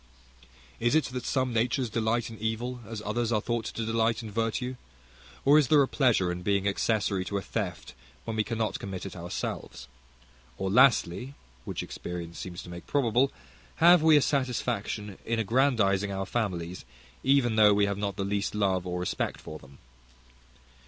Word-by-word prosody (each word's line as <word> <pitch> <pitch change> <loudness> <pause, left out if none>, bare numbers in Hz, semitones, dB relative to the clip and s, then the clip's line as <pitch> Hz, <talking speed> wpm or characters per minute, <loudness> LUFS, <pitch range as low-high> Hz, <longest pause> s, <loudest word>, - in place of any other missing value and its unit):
Is 120 +5 +2
it 155 - +4
that 125 - -4
some 130 -2 0
natures 120 +3 +1
delight 115 +1 -1
in 110 - -10
evil, 115 +3 -3
as 110 -2 -6
others 115 +2 -1
are 110 - +2
thought 115 0 -2
to 115 - -4
delight 115 0 +1
in 110 - -7
virtue? 115 +4 -1 0.7
Or 145 +2 +7
is 145 - +2
there 145 +1 +6
a - - 0
pleasure 115 -12 +2
in 90 0 -5
being 100 +1 +1
accessory 100 -1 0
to 100 - -2
a - - -2
theft 95 -7 -4 0.3
when 115 - -3
we 110 - +2
cannot 115 -1 -2
commit 95 -1 -6
it 95 - -7
ourselves? 85 -1 -5 0.7
Or 95 -1 -2
lastly 125 0 +3 0.3
(which - - -4
experience 85 -1 -7
seems 85 -2 -7
to - - -11
make 85 0 -9
probable), 135 -1 +2 0.4
have 175 0 +6
we 155 -1 +6
a 145 - +4
satisfaction 110 -6 -2
in 115 0 -1
aggrandizing 110 -4 +2
our 95 0 -3
families, 90 -6 -3 0.4
even 135 -4 +3
though 105 -2 +6
we 100 0 +3
have 100 0 -2
not 100 -2 -2
the 100 -1 -2
least 100 +1 -1
love 95 -3 +1
or 90 0 -2
respect 90 - -2
for 80 - -9
them? 70 0 -17
110 Hz, 175 wpm, -28 LUFS, 100-120 Hz, 0.7 s, Or